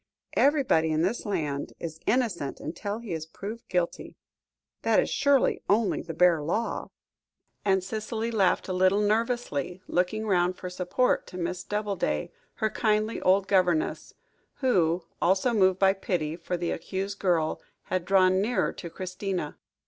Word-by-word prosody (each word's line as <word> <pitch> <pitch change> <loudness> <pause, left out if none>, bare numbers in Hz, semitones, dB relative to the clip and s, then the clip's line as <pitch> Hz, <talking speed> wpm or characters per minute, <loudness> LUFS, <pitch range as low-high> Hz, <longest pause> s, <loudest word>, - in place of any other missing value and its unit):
Everybody 270 - +3
in 155 +1 +1
this 210 +5 -1
land 150 -8 -2
is 160 -1 -6
innocent 220 - 0
until 200 +6 -4
he 225 -6 -6
is 160 -1 -4
proved 220 +7 -8
guilty 180 -2 -2 0.6
that - - +3
is - - 0
surely 280 -2 +3
only 210 +1 +2
the 165 -2 -7
bare 170 -2 +4
law," 175 +10 -2 0.7
and 190 -2 +2
Cicely 220 +3 -3
laughed 200 -5 +2
a 185 - -2
little 185 +2 +3
nervously, 210 - 0
looking 185 +5 0
round 180 -3 +2
for 180 - -6
support 180 +8 0
to 180 - -9
Miss 180 +1 -3
Doubleday, 200 - -2 0.2
her 215 0 0
kindly 215 0 0
old 190 +1 +3
governess, 180 -5 +1 0.4
who, 180 - +2 0.2
also 190 +7 +3
moved 190 -4 +4
by 195 0 +4
pity 170 -5 -2
for 175 +1 -4
the 170 0 -2
accused 195 +3 -4
girl, 165 -4 +1 0.2
had 185 -1 -2
drawn 185 0 +4
nearer 235 +4 0
to 170 - -8
Christina. 185 -2 -4
185 Hz, 150 wpm, -27 LUFS, 175-215 Hz, 0.7 s, bare